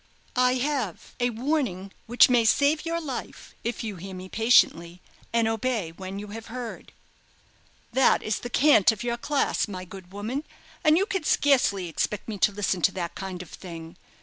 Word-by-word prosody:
"I 250 0 +4
have 260 - -2
a 245 0 +2
warning 235 - -2 0.2
which 240 +2 +6
may 245 -2 +4
save 290 +7 +3
your 335 0 -1
life 280 -6 -7
if 235 -1 -3
you 210 -4 -5
hear 190 +2 -8
me 185 +1 -8
patiently, 180 -7 +3 0.3
and 230 -1 +2
obey 225 -5 -1
when 190 +3 -7
you 205 +1 -7
have 225 +2 -8
heard." 240 0 -7 1.0
"That 265 - +4
is 215 -2 -1
the 245 - -6
cant 250 -5 +5
of 220 0 -6
your 240 0 -1
class, 285 0 0
my 185 -3 -6
good 185 0 -12
woman; 220 +9 -4 0.4
and 310 +1 +5
you 390 - +2
can 390 -6 -2
scarcely 250 -12 +2
expect 195 +5 -2
me 210 -3 -5
to 205 - +4
listen 195 -3 -1
to - - +4
that 175 -3 -4
kind 185 -2 -6
of 175 - -16
thing. 165 -2 -9
225 Hz, 180 wpm, -26 LUFS, 190-255 Hz, 1.0 s, which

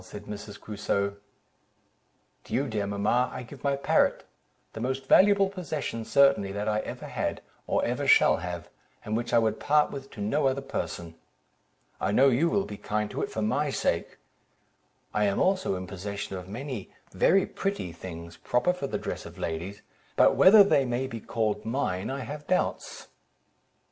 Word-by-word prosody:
said 100 +2 -10
Mrs. 105 0 -8
Crusoe. 100 -1 -2 1.3
"To - - -9
you, 140 +3 +1
dear 105 -4 -2
mamma, 105 +5 +1
I - - -6
give 130 +2 -13
my 140 -1 +2
parrot, 140 - +2 0.5
the - - -7
most 130 +2 -2
valuable 200 +6 +5
possession 155 - -4
certainly 140 -9 +4
that 100 +1 -3
I 105 0 +1
ever - - -6
had, - - -3 0.3
or - - +1
ever - - -1
shall - - +6
have, 85 -2 -5 0.4
and 110 - -2
which 120 +1 -2
I 120 - +4
would 110 -2 +1
part 150 0 +3
with 135 0 -7
to - - -11
no 135 +8 +1
other 135 +1 -1
person. 85 -8 -5 0.9
I - - 0
know 135 +6 +5
you 140 +7 +2
will 200 +1 +1
be 105 - -7
kind 105 +1 -2
to - - -3
it - - -2
for 110 - -3
my 140 +7 +1
sake. - - -1 1.0
I 105 - +2
am 100 -1 +1
also 185 - +1
in 95 0 -5
possession 100 +2 -5
of 90 0 -8
many 125 -1 -6 0.2
very 195 +2 +3
pretty 195 - -3
things, 85 0 -9
proper 125 +9 +1
for 180 -6 -4
the - - -2
dress - - -5
of - - -13
ladies; 85 +5 -5 0.3
but - - +5
whether 200 +2 +8
they 170 -8 +3
may 125 +1 -1
be 115 -3 -6
called 105 -1 -2
mine, 110 -6 -2
I 135 +1 -3
have 145 +3 -7
doubts." 185 - -1
115 Hz, 180 wpm, -27 LUFS, 100-140 Hz, 1.3 s, whether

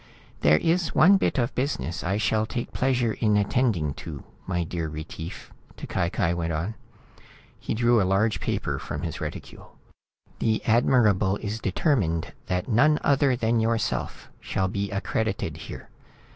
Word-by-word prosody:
"There 75 +2 +5
is 165 - 0
one 195 +5 +7
bit 190 - 0
of 125 0 0
business 85 - -2
I 95 +3 0
shall 110 0 +1
take 120 0 -4
pleasure 125 -3 +1
in 105 -2 +2
attending 100 - +1
to, 75 -5 -7 0.2
my 90 -2 0
dear 85 -1 -3
Retief," 80 +2 -8 0.2
T'Cai 85 - -2
Cai 90 -4 0
went 85 -1 -2
on. 85 +8 -2 0.9
He - - -3
drew 120 0 +4
a 95 0 +1
large 105 +3 +2
paper - - -2
from - - -5
his - - -4
reticule. - - -8 0.6
"The 110 -1 0
Admirable 110 -4 +3
is 105 +1 -4
determined 95 - 0
than 90 0 0
none 140 +6 +4
other 140 -2 +3
than 115 -1 +1
yourself 115 0 -1
shall 95 - -1
be 100 +1 -2
accredited 100 +1 -2
here. - - -9
110 Hz, 150 wpm, -26 LUFS, 90-120 Hz, 0.9 s, one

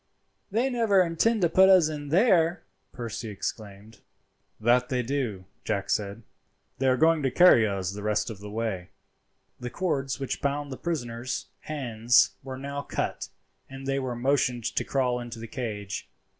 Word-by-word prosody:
they 230 +6 +1
never 225 -7 +3
intend 180 +5 +1
to - - +6
put 190 +3 +5
us 185 -5 +6
in 145 -2 -5
there," 175 - +3 0.3
Percy 115 -2 -5
exclaimed. 105 +1 -7 0.6
"That 120 +3 +3
they 125 -1 0
do," 120 -8 -2 0.2
Jack - - -2
said. 105 +2 -2 0.6
"They 135 - +1
are 130 0 +4
going 160 +2 +4
to 135 - +1
carry 125 -8 +6
us 95 -2 -2
the 105 - -7
rest 105 +2 0
of 105 - -9
the 105 +1 -8
way." 105 -4 -3 0.7
The 125 - -5
cords 140 -4 -2
which 135 - -3
bound 140 0 -1
the 130 - -5
prisoners' 125 -7 -4
hands 120 -5 +2
were 130 -1 -7
now 140 +1 -4
cut, - - -3 0.4
and 135 0 -9
they 135 0 0
were 130 -2 -3
motioned 130 -1 +1
to - - +1
crawl 125 -3 0
into 120 -1 -7
the 115 - -7
cage. 105 -5 -5
130 Hz, 165 wpm, -27 LUFS, 115-155 Hz, 0.7 s, to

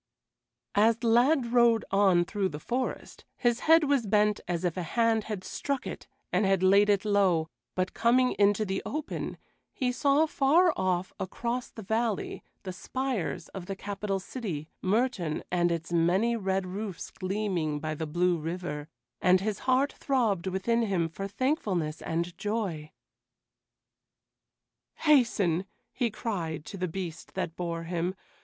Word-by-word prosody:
As 220 +2 +4
the 235 0 -2
lad 245 +1 +3
rode 235 -2 +4
on 190 -3 +4
through 195 0 -1
the 150 - -7
forest, 250 +10 -4
his 240 -2 +2
head 325 0 +5
was 280 -6 +1
bent 210 0 +3
as 175 0 -1
if 175 - 0
a 185 - -2
hand 225 +5 +1
had 210 -4 -4
struck 280 +5 -3
it - - -7 0.3
and - - +3
had 195 -1 +2
laid 200 +2 +5
it 200 0 +2
low, 190 -6 +2 0.3
but 185 0 -1
coming 250 +2 +3
into 205 +1 +4
the 195 -1 -2
open, 305 +1 -4 0.3
he 255 -3 -1
saw 280 +4 +3
far 315 +4 +4
off, 185 -1 -1
across 235 +6 -3
the 220 - -10
valley, 220 +1 -1 0.2
the 185 -2 -5
spires 245 -5 -3
of 185 -2 -8
the 195 - -3
capital 200 0 -3
city, 185 - -5
Mertoun, 195 -6 0
and 175 -1 +2
its 165 0 -3
many 185 +8 +3
red 190 -3 -1
roofs 195 0 -5
gleaming 185 -6 -2
by 155 +1 -3
the 155 +1 -4
blue 175 +2 +1
river, 160 -2 -4 0.3
and 185 0 +5
his 205 +1 -2
heart 265 +2 +3
throbbed 225 -10 0
within 190 +5 +1
him 190 -7 0
for 195 +4 -5
thankfulness 200 - -1
and 170 +2 -2
joy. 195 -8 -2 2.0
"Hasten!" 215 - +3 0.3
he 245 -2 0
cried 175 -9 -4
to 200 - -7
the 185 - 0
beast 170 -1 -6
that 180 -3 -3
bore 170 -1 -3
him. 175 +2 -2
195 Hz, 150 wpm, -29 LUFS, 175-235 Hz, 2.0 s, head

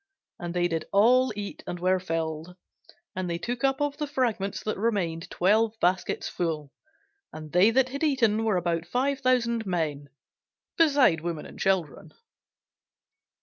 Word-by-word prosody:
And 175 0 -5
they 175 0 +2
did 165 -2 -3
all 245 +5 +4
eat, 200 -1 -6
and 175 - -4
were 185 +1 +2
filled: 165 -1 -4 0.6
and 185 -1 -3
they 170 - -1
took 240 +7 -4
up 270 0 +2
of 290 -1 -1
the 300 - -3
fragments 235 -8 -1
that 215 -2 -3
remained 185 -7 -1
twelve 220 +4 +2
baskets 180 +1 0
full. 155 -5 -3 0.6
And 155 -1 -9
they 180 +5 +5
that 255 +2 +2
had 280 +2 -6
eaten 230 -8 +2
were 215 -4 +1
about 170 -1 -1
five 270 +6 0
thousand 235 -4 +1
men, 150 -5 -2 0.7
beside 280 - +4
women 170 -2 -4
and - - -12
children. 190 -5 -1
195 Hz, 150 wpm, -27 LUFS, 170-245 Hz, 0.7 s, they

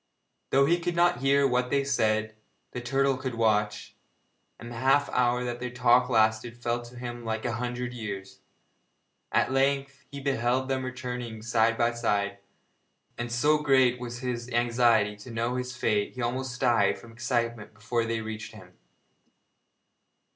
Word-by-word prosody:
Though 135 +1 +4
he 170 +4 +2
could 175 0 -2
not 175 +1 +3
hear 140 +1 +4
what 125 -1 0
they 140 +1 +2
said, 110 -5 +1 0.4
the 125 - -5
turtle 135 +2 +1
could 130 -2 -4
watch, 105 -2 0 0.6
and 120 +1 -9
the 120 - -7
half 135 +4 +3
hour 125 0 +2
that 120 -1 -4
their 125 - -4
talk 125 0 +3
lasted 110 0 +2
felt 120 0 -2
to 120 +1 -13
him 120 -1 -6
like 110 0 -3
a 120 - 0
hundred 125 +1 -3
years. 95 -4 -6 0.9
At - - +2
length 135 0 0
he 140 - -7
beheld 130 -1 0
them 130 -1 0
returning 125 -3 -5
side 110 -1 +2
by 120 0 +2
side, 100 -4 -1 0.8
and 120 0 -5
so 150 +6 +3
great 130 -4 +3
was 120 -1 -6
his 125 -1 -3
anxiety 120 -3 +2
to 105 +4 -11
know 115 +2 -2
his 125 0 -4
fate 105 -3 0
he 125 - -5
almost 130 +1 -3
died 115 -6 +3
from 115 - -14
excitement 115 -1 -2
before 115 +2 -1
they 115 0 -2
reached 110 0 -7
him. 90 -4 -14
120 Hz, 160 wpm, -27 LUFS, 115-130 Hz, 0.9 s, Though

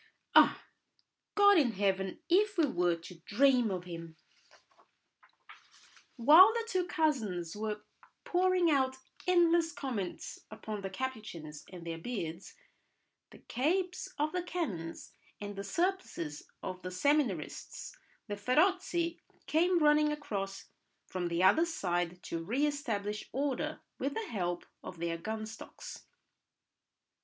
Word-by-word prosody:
"Ah, - - +6 0.7
God 405 -2 +7
in 250 -6 +2
heaven! 195 - 0
If 400 +3 +3
we 330 - +5
were 175 -9 +1
to 165 +1 -12
dream 245 +5 +3
of 185 -2 -3
him— 165 -2 -8 1.0
" - - -32 0.7
While 315 - +9
the 465 -1 -1
two 370 -4 0
cousins 220 - 0
were 210 0 -3 0.4
pouring 365 -2 +3
out 265 -2 +2 0.3
endless 340 -2 +4
comments 235 - -4
upon 215 -1 -6
the 195 - -4
Capuchins 190 - -6
and 175 -2 -9
their 165 -1 -4
beards, 170 -4 -5 0.7
the - - -14
capes 355 +8 -1
of 300 +1 0
the 360 - -1
canons 240 - -4 0.3
and 205 0 -6
the 200 - -5
surplices 200 - -2 0.2
of 185 -1 -5
the 185 - -5
seminarists, 215 - -1 0.3
the 205 - -3
'feroci' 340 - +1 0.2
came 350 +3 +3
running 300 0 +5
across 200 -10 -4 0.4
from 180 -2 -3
the 170 +1 0
other 320 - +5
side 175 - -2
to 165 0 -4
re 250 - +1
establish 220 -8 -2
order 285 +3 -2 0.2
with 275 +2 -2
the 450 - -2
help 175 -5 -2 0.2
of 180 - -8
their 165 0 -2
gun 220 +3 -4
stocks. 220 0 -10
230 Hz, 130 wpm, -32 LUFS, -, 1.0 s, While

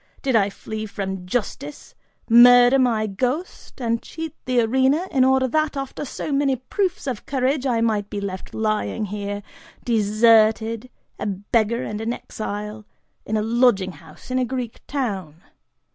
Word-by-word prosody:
Did 265 -3 +1
I 205 -2 +4
flee 215 +2 -6
from 190 -2 -5
justice, 260 +7 -4 0.3
murder 245 +2 +7
my 230 -4 +2
ghost, 255 - -3
and 230 -2 -1
cheat 320 -1 -7
the 250 -1 +2
arena, 265 +9 +2
in 265 -2 +3
order 265 0 +3
that, 310 +1 0
after 275 +1 -4
so 290 - -5
many 275 -1 +2
proofs 365 - -2
of 255 -6 -4
courage, 270 +1 0
I 235 -3 +1
might 210 -3 0
be 205 - -4
left 195 -2 -6
lying 215 0 -1
here 205 0 -5 0.4
deserted, 225 +1 +3 0.3
a - - -2
beggar 215 +4 0
and 210 0 -4
an 225 +2 -1
exile, 210 -1 -6 0.4
in 220 - 0
a 210 - 0
lodging 225 -4 +3
house 160 +7 -14
in 255 - +1
a - - +2
Greek 250 -2 -4
town? 200 - -3
230 Hz, 155 wpm, -22 LUFS, 210-260 Hz, 0.4 s, murder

